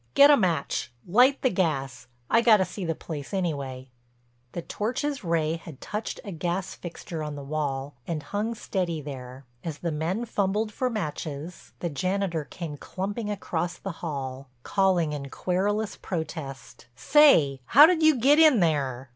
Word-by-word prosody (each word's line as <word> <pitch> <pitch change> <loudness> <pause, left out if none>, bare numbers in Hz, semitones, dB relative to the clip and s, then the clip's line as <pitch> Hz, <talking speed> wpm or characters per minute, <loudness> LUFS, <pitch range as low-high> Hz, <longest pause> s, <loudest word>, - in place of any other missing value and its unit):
Get 285 +1 +9
a - - +8
match, 170 - 0 0.2
light 250 +9 +4
the 255 - +3
gas—I 135 - -1
got 230 -2 +6
to 190 - +1
see 185 +2 -7
the 165 -1 -1
place 150 +4 -6
anyway." 135 -8 -3 0.6
The 170 - -4
torch's 260 - -2
ray 165 -2 0
had 160 -4 -11
touched 210 +1 -5
a 200 - -6
gas 175 +3 -2
fixture 170 -1 -7
on 150 -1 -4
the 140 - -7
wall 140 -1 -3
and 160 -3 -3
hung 215 +5 -2
steady 180 -6 -2
there. 130 -2 -8 0.2
As 160 -3 -4
the 170 0 -3
men 170 +9 -2
fumbled 210 0 0
for 255 +3 0
matches, 160 - -5
the 175 - -1
janitor 185 +1 -1
came 160 -3 -7
clumping 205 +7 -4
across 175 -4 -3
the 195 - -5
hall, 135 -4 -5
calling 185 -6 +2
in 140 -2 -5
querulous 200 +7 -1
protest: 160 -8 -6
"Say—how'd 285 - +6
you 315 -1 +6
get 280 +6 +5
in 310 -7 +7
there? 135 -6 0
170 Hz, 155 wpm, -26 LUFS, 145-205 Hz, 0.6 s, Get